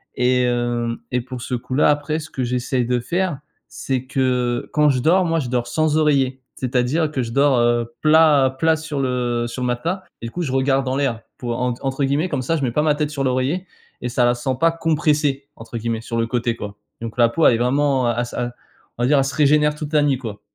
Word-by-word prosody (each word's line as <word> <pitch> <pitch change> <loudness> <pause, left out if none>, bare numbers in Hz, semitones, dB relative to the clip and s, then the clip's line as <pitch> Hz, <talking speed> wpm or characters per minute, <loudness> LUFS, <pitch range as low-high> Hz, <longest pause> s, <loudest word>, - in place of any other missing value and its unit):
et 125 0 +2
hem, 120 -1 -1
et 125 - 0
pour 125 0 -8
ce 125 - -3
coup-là, 130 +4 +1
après, 150 +1 0
ce 155 0 -9
que 130 - -3
j'essaye 125 0 -1
de 125 0 0
faire, 170 +3 -1 0.3
c'est 130 -1 -3
que, 125 -2 0
quand 150 -1 +4
je 130 -3 +1
dors, 180 +7 +3
moi, 165 -1 +1
je 130 -5 -3
dors 125 -1 0
sans 155 -1 +1
oreiller. 135 -4 +2
C'est-à-dire 130 +5 0
que 130 -4 -1
je 115 - -6
dors, 140 +1 +3
heu, 120 0 +1
plat 155 -4 +5
plat 160 +1 +3
sur 155 -3 -5
le 125 -2 -1
sur 120 +2 -6
le - - 0
matelas, 165 +11 -2 0.2
et 115 - -4
coup, 175 - -5
je 140 - -3
regarde 135 0 +1
en 130 - 0
l'air 130 -5 -1 0.2
pour, 120 -2 -3
entre 125 -1 -2
entre 135 +1 -1
guillemets, 145 +6 +1
comme 140 -5 -2
ça, 165 +7 0
je 145 - -4
mets 125 - 0
pas 150 - +1
ma 155 -1 +3
tête 150 0 -1
sur 140 -2 -2
l'oreiller 130 +8 0 0.4
et 125 - -3
ça 120 0 +2
la 120 0 +3
sent 130 +1 -2
pas 165 +2 +4
«compressée» 150 -4 0
entre 115 +1 -8
guillemets, 115 0 -2
sur 115 0 -4
le 115 - 0
côté, 120 -1 -1
quoi, 105 -3 -7 0.3
donc 115 0 -6
la 120 -1 +5
peau, 155 +7 +1
elle 120 - +5
est - - 0
vraiment, 135 +2 +1
heu, 120 - +3
à 120 - -1
s 120 - -5
à 120 0 -3 0.4
on 120 - -2
va - - +3
dire, 145 +2 +4
elle 135 - +3
se 135 - -3
régénère 150 0 +3
toute 150 0 -7
la 150 - +4
nuit, 140 -2 +2
quoi. 110 -5 -7
130 Hz, 250 wpm, -21 LUFS, 120-150 Hz, 0.4 s, plat